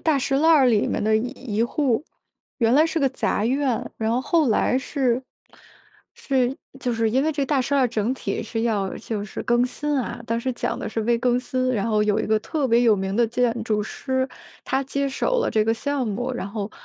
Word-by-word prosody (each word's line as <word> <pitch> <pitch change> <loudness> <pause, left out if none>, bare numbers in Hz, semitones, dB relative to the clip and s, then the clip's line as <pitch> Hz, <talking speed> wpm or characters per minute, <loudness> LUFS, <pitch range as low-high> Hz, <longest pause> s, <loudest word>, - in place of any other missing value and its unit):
大 310 -3 +2
栅 270 +1 0
栏 320 - +5
儿 295 -5 +6
里 220 -4 +3
面 - - -1
的 215 0 +3
一 225 +3 +1 0.3
一 225 - +3
户。 250 0 0 0.6
原 230 -1 +3
来 310 +3 +5
是 325 0 -1
个 275 - +2
杂 215 -5 -1
院， 260 -1 0
然 220 0 0
后 235 - +1
后 315 -3 +2
来 250 +3 +2
是 260 -2 0 0.9
是， 260 -1 0 0.2
就 245 - -1
是 225 -1 +1
因 260 +4 +2
为 315 - +1
这 285 -2 -1
大 275 -2 +1
栅 280 +3 0
栏 265 - +4
整 225 +2 0
体 - - -3
是 225 -1 -3
要 205 -5 0
就 220 -2 -4
是 205 - -6
更 240 +1 +2
新 295 +3 -3
啊， 240 -1 -4
当 230 +1 -1
时 260 - -1
讲 - - -2
的 - - -4
是 225 0 -2
微 235 +1 +2
更 245 0 +2
新， 255 0 -1
然 205 0 -1
后 215 -2 +2
有 210 0 +1
一 - - -1
个 215 0 +2
特 280 +4 -1
别 235 0 +4
有 225 -3 +4
名 195 0 -2
的 235 +1 +3
建 235 0 0
筑 215 -2 0
师， 260 +4 -2 0.4
他 265 +1 0
接 275 +1 -2
手 - - 0
了 - - 0
这 215 - +2
个 225 +1 +1
项 275 -1 -2
目， 245 +5 -2
然 220 -5 -4
后 205 0 -4
245 Hz, 250 characters per minute, -23 LUFS, 220-270 Hz, 0.9 s, 儿